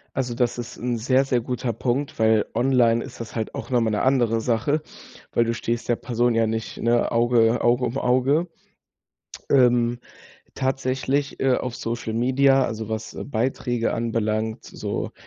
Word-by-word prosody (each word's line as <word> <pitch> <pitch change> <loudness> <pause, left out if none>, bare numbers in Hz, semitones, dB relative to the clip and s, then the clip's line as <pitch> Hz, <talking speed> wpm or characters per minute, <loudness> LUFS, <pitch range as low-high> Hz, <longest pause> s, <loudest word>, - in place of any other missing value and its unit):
Also, 125 -2 -1
das 120 -1 0
ist 120 0 -6
'n 120 0 -1
sehr, 130 +4 +2
sehr 125 -2 +1
guter 125 0 -3
Punkt, 125 +5 -2
weil 110 -1 +3
online 120 -2 +3
ist - - -11
das 115 0 -7
halt 110 - -3
auch - - -6
noch 125 -2 +3
mal 115 - +1
'ne 105 - 0
andere 120 -4 +2
Sache, 125 +7 0 0.5
weil 120 - +3
du 115 - -1
stehst 115 +1 -3
der 120 - +2
Person 120 0 0
ja 115 0 +3
nicht, 110 0 -4
ne, 120 +1 +1
Auge 115 0 +3
Auge 120 +1 +3
um 125 +2 -2
Auge. 135 +7 +2 1.0
Ähm, 120 -2 +4 0.6
tatsächlich, 135 +1 -1
äh, 130 -1 +3
auf 125 -1 -4
Social 115 -1 -4
Media, 135 +3 +3
also 110 -2 -4
was 110 0 -5
Beiträge 120 -1 -1
anbelangt, 110 -1 -2
so, - - -4
120 Hz, 165 wpm, -23 LUFS, 115-130 Hz, 1.0 s, Ähm